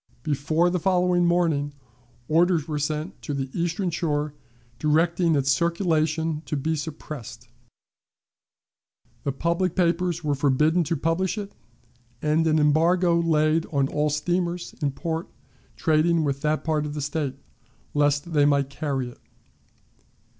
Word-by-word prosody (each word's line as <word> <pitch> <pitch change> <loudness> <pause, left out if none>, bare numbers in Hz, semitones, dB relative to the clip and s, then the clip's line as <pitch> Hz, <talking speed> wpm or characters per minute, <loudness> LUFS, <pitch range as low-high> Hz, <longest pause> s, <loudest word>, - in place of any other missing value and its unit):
Before 155 +4 +1
the 180 - 0
following 180 0 +2
morning, 160 -5 +1 0.5
orders 165 -1 +3
were 150 -2 -2
sent 155 +5 -3
to 145 - -4
the 135 -1 -3
Eastern 175 +2 -1
Shore, 150 -3 -1 0.5
directing 165 +3 +2
its 140 -1 +2
circulation 160 -1 +1
to 150 - -2
be 160 +4 -1
suppressed; 145 -6 -7 1.7
the 140 - 0
public 170 +5 -1
papers 175 -1 +1
were 150 -1 +1
forbidden 150 +5 +2
to 165 - 0
publish 165 +7 0
it, 205 -1 -5 0.7
and 155 +2 +1
an 155 0 +3
embargo 170 +3 +3
laid 160 0 +2
on 140 -3 +1
all 150 0 0
steamers 175 +3 -1
in 145 - +1
port 160 +4 -4 0.5
trading 160 0 +2
with 140 -2 -1
that 155 0 0
part 155 -2 0
of 145 - -6
the 150 - -3
State, 145 -2 -2 0.6
lest 145 +2 +1
they 145 -2 +4
might 140 -1 +2
carry 135 -2 -2
it. 120 - -15
155 Hz, 135 wpm, -25 LUFS, 145-170 Hz, 1.7 s, they